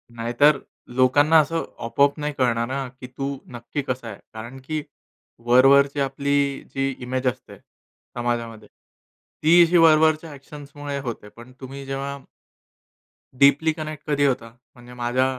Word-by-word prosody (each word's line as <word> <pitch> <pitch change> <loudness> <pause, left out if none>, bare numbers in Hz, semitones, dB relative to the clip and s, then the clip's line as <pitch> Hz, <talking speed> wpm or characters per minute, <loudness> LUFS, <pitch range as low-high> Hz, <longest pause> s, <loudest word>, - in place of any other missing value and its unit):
नाहीतर 120 +6 +3 0.4
लोकांना 145 +5 +5
असं 165 +2 0 0.2
अपो-आप 140 +5 +2
नाही 150 0 -3
कळणार 115 -2 +1
ना, 135 +1 -3
की 130 0 -12
तू 135 +2 -5 0.2
नक्की 120 +4 -4
कसा 130 -2 -3
आहे? 105 - -9
कारण 115 +4 -9
की 155 +1 -2 0.6
वर-वरची 140 +3 +5
आपली 140 0 0
जी 135 0 0
इमेज 130 +1 -2
असते 125 - -4
समाजामध्ये, 115 -3 -6 0.8
ती 170 +3 +7
अशी 170 +1 +3
वर-वरच्या 160 -1 +4
ॲक्शन्समुळे 145 0 -8
होते. 115 -5 -6
पण 120 +4 -15
तुम्ही 135 +1 -8
जेव्हा 135 +1 -4 1.2
डीपली 140 +3 +5
कनेक्ट 155 -1 -7
कधी 145 -1 +2
होता? 125 -4 -1 0.3
म्हणजे 120 0 -14
माझ्या 125 +1 0
135 Hz, 135 wpm, -23 LUFS, 125-145 Hz, 1.2 s, ती